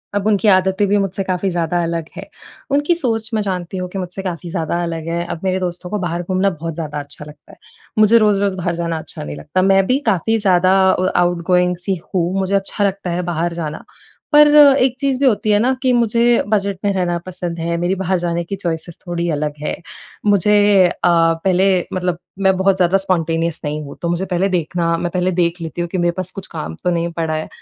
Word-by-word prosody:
अब 205 -1 -1
उनकी 215 0 +2
आदतें 190 +1 +3
भी 205 +1 +2
मुझसे 195 -1 -1
काफ़ी 185 +1 -1
ज़्यादा 175 0 -1
अलग 165 -1 -2
हैं, - - -7 0.5
उनकी 290 +5 +2
सोच 225 -8 -1
मैं 215 - +1
जानती 185 -2 -4
हूँ 180 0 -4
कि 195 - -7
मुझसे 180 +1 -5
काफ़ी 175 -2 -5
ज़्यादा 170 0 -2
अलग 165 -1 -4
है। 170 +1 -1
अब 170 -1 -5
मेरे 185 0 0
दोस्तों 180 0 -4
को 210 - -2
बाहर 175 -1 -3
घूमना 185 +2 +1
बहुत 165 -2 -5
ज़्यादा 150 -3 -4
अच्छा 145 +1 -8
लगता 150 -1 -15
है, - - -17 0.4
मुझे 215 +2 +6
रोज़-रोज़ 200 -3 +2
बाहर 175 -1 -2
जाना 170 -1 -2
अच्छा 155 - -6
नहीं 75 0 -6
लगता। 130 - -1
मैं 195 0 +4
भी 260 +2 +2
काफ़ी 220 +1 +1
ज़्यादा 190 -2 +3
अ, 185 0 0
आउटगोइंग 180 +1 +2
सी 190 -3 -1 0.2
हूँ 175 0 +1
मुझे 190 +1 0
अच्छा 195 +1 0
लगता 195 -2 -2
है 175 +1 -1
बाहर 170 +1 -1
जाना, 160 -3 -5 0.5
पर 295 0 +7
एक 270 -3 +6
चीज़ 275 -2 0
भी 280 - +2
होती 215 -4 +2
है 205 - +4
ना 250 +4 +2
कि 260 -2 +2
मुझे 235 0 +3
बजट 200 -2 0
में 200 - +2
रहना 175 -2 0
पसंद 175 -2 -5
है, 170 +1 -1
मेरी 175 +2 0
बाहर 190 0 0
जाने 170 0 -1
की 185 +4 -5
चॉइसेस 170 -3 -4
थोड़ी 175 0 -2
अलग 150 0 -2
हैं। 150 - -3 0.5
मुझे 205 0 +4 0.3
अ, - - -2 0.2
पहले 170 +3 +3 0.2
मतलब 180 -2 -1 0.2
मैं 190 -1 +4
बहुत 190 +1 +3
ज़्यादा 185 +1 +3
स्पॉन्टेनियस 165 -3 -1
नहीं 150 0 -3
हूँ 140 - -9
तो 170 - -1
मुझे 175 +2 -1
पहले 180 +2 +1
देखना 170 -1 0
मैं 175 - -2
पहले 180 +1 0
देख 170 0 +1
लेती 165 +1 -5
हूँ 175 - -2
कि 185 - -3
मेरे 175 0 +2
पास 185 -1 -3
कुछ 195 -1 -8
काम 80 +1 -6
तो - - +1
नहीं 170 0 -1
पड़ा 165 -1 -2
है, 155 - -4
180 Hz, 220 wpm, -18 LUFS, 170-195 Hz, 0.5 s, पर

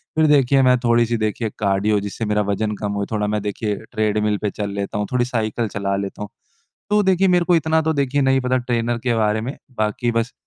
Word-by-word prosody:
फिर 160 0 +4
देखिए, 140 -2 +4
मैं 125 -1 +4
थोड़ी-सी 120 -1 +2
देखिए, 110 +1 -2
कार्डियो, 100 +1 +1
जिससे 100 +3 -4
मेरा 105 0 +1
वजन 105 +2 -1
कम 105 0 -3
हो, 100 0 -2
थोड़ा 105 -1 0
मैं 105 0 -1
देखिए, 105 +1 -2 0.2
ट्रेडमिल 105 -2 0
पर 105 - 0
चल 105 0 -4
लेता 100 0 -3
हूँ, 105 0 -2
थोड़ी 125 -1 +1
साइकिल 115 -2 -2
चला 100 -1 -2
लेता 100 +1 -5
हूँ। 105 - -5 0.6
तो 210 0 +4
देखिए, 190 0 +3
मेरे 180 -1 +3
को 175 -1 +3
इतना 160 0 +2
तो, 160 0 +1
देखिए, 140 -1 0
नहीं 135 0 +3
पता 130 0 0
ट्रेनर 120 -1 -1
के 120 - +2
बारे 110 -1 +1
में। 125 +6 -5 0.2
बाकी 110 +3 0
बस 115 +1 -1
115 Hz, 225 wpm, -21 LUFS, 105-130 Hz, 0.6 s, फिर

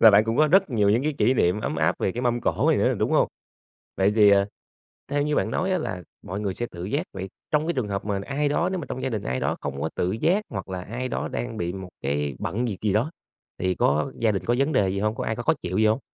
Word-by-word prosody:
và 110 - +9
bạn 105 +2 +6
cũng 115 +2 -1
có 155 +1 +5
rất 190 -2 +4
nhiều 105 -4 +2
những 115 +5 +3
cái 155 +1 0
kỷ 130 - +4
niệm 90 0 +2
ấm 80 - -2
áp 80 0 +2
về 95 - 0
cái 120 - -3
mâm 120 -1 +1
cổ - - +2
này - - +3
nữa, - - +3
đúng - - +1
hông? - - +4 0.7
Vậy 100 +2 +3
thì, 105 -2 +7
ờ, 100 0 +5 0.6
theo 145 0 0
như 150 0 0
bạn - - +1
nói 190 +1 0
á, 185 - +2
là 90 - -4 0.2
mọi 95 +3 -4
người 100 -3 -1
sẽ 120 - -3
tự 85 0 -7
giác, 145 - -1
vậy 95 0 -5 0.2
trong 155 +1 +2
cái 170 - +1
trường 125 -6 -1
hợp 100 0 -3
mà 100 -2 -1
ai 145 +1 0
đó 170 +4 +1
nếu 185 - -1
mà 150 - -5
trong 130 - -4
gia 130 - 0
đình 110 -4 -3
ai 65 +1 -1
đó - - 0
không 70 -1 -4
có 80 - -1
tự 90 - 0
giác 175 - +1
hoặc 95 -4 -5
là 95 -1 -4
ai 125 +6 -4
đó - - -2
đang 120 -2 -4
bị 85 -1 -2
một 95 -1 -7
cái 70 0 -1
bận 120 +5 -1
việc 100 -5 -3
gì 105 -2 +1
đó 120 +10 +1 0.5
thì 95 0 0
có 75 +2 +1
gia 115 -2 +3
đình 95 - -2
có 120 - +2
vấn 140 +4 +2
đề 100 -5 +3
gì 100 +1 -1
hông? 110 +2 0
Có - - -3
ai 110 - -1
có 120 - -5
khó - - +4
chịu 90 +2 -2
gì 110 - +4
hông? 110 +5 +3
110 Hz, 300 wpm, -25 LUFS, 95-130 Hz, 0.7 s, và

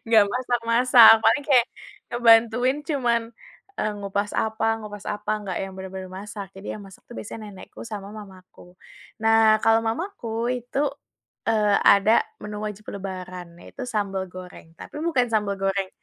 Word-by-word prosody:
nggak 225 -2 +6
masak-masak 245 -1 +5
paling 225 +6 +4
kayak, 250 -4 +5 0.4
ngebantuin 240 +2 +4
cuman, 245 -6 +1 0.6
eee, 215 - 0
ngupas 200 +1 -2
apa 220 0 -1
ngupas 205 -2 -9
apa 210 0 -4
nggak 185 -3 -5
yang 195 - -8
bener-bener 190 0 -7
masak 205 +1 -7
jadi 205 +2 -7
yang - - -10
masak 190 - -16
itu - - -9
biasanya 215 0 -8
nenekku 195 - -13
sama 205 -3 -7
mamaku, 185 -3 -14 0.4
nah 220 -1 +5
kalau 225 0 +4
mamaku 315 - -4 0.3
itu, 245 +3 -5 0.7
eee, 210 -2 +2 0.2
ada 200 +3 +4 0.2
menu 210 0 -6
wajib 210 0 -7
lebaran 185 -3 -8
yaitu - - -10
sambal 200 -4 -2
goreng 180 -3 -11
tapi - - -11
bukan 270 -8 +2
sambal 205 -2 0
goreng, 195 0 -1
210 Hz, 145 wpm, -24 LUFS, 195-230 Hz, 0.7 s, nggak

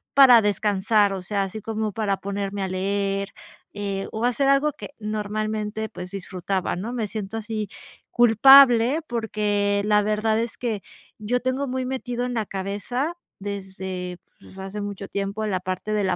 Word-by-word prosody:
para 255 -4 +9
descansar, 205 0 +2
o 190 - -4
sea, 200 +2 -1
así 195 +3 -6
como 220 0 -2
para 200 -2 -1
ponerme 200 0 -3
a - - -1
leer, 195 +1 -1 0.4
eh, 200 -1 -3
o 220 +2 -2
hacer 250 +3 +2
algo 275 +2 +4
que - - -9
normalmente, 215 0 -3
pues, 180 0 -8
disfrutaba, 185 0 -3
¿no?, 200 +7 -4
me 240 -3 -2
siento 210 0 -5
así 215 -2 -4 0.4
culpable, 245 +3 +7
porque 205 -3 0
la 210 0 +4
verdad 215 +1 +1
es 230 0 -3
que 225 -5 -2 0.4
yo 225 +4 0
tengo 255 +3 -1
muy 260 0 -2
metido 245 -1 -3
en 250 - -3
la 220 -4 -2
cabeza 205 - -3 0.2
desde, 190 -2 -5 0.2
pues, 190 - -16
hace 195 +2 -6
mucho 200 -1 -6
tiempo 200 +2 -3
en 215 - -1
la 185 - 0
parte 185 +3 -4
de 210 -2 +1
la 185 - +1
210 Hz, 165 wpm, -24 LUFS, 195-230 Hz, 0.4 s, para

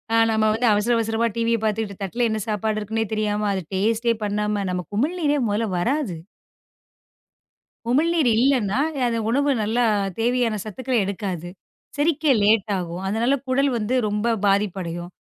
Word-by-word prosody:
ஆ - - +4
நாம 220 -1 +2
வந்து 235 +3 +1
அவசர, 210 +3 +1
அவசரமா 225 +1 0
டிவிய 230 0 +1
பாத்துட்டு 215 -1 -1
தட்டுல 235 +5 0
என்ன 220 0 -1
சாப்பாடு 215 0 -1
இருக்குனே 220 +2 -2
தெரியாம, 210 -1 0
அதை 190 -2 -3
டேஸ்ட் 225 +4 +1
பண்ணாம 210 0 -1
நமக்கு 180 +2 -5
உமிழ்நீரே 295 +1 +1
மொதல்ல 215 +2 0
வராது. 240 - -1 1.7
உமிழ் 295 +7 +3
நீர் 310 -7 +3
இல்லன்னா, 250 -3 +2 0.3
அந்த 230 -1 -1
உணவு 280 +4 +2
நல்லா 225 +3 +1 0.4
தேவையான 240 -1 +1
சத்துக்களை 250 +4 -2
எடுக்காது. 185 -3 -4 0.5
செரிக்க 300 -1 +2
லேட் 210 0 +3
ஆகும். 175 0 -5
அதனால 230 +7 +1
குடல் 275 +2 +2
வந்து 225 +3 -1
ரொம்ப 210 +3 0
பாதிப்படையும். 185 -4 -1
220 Hz, 140 wpm, -23 LUFS, 205-245 Hz, 1.7 s, ஆ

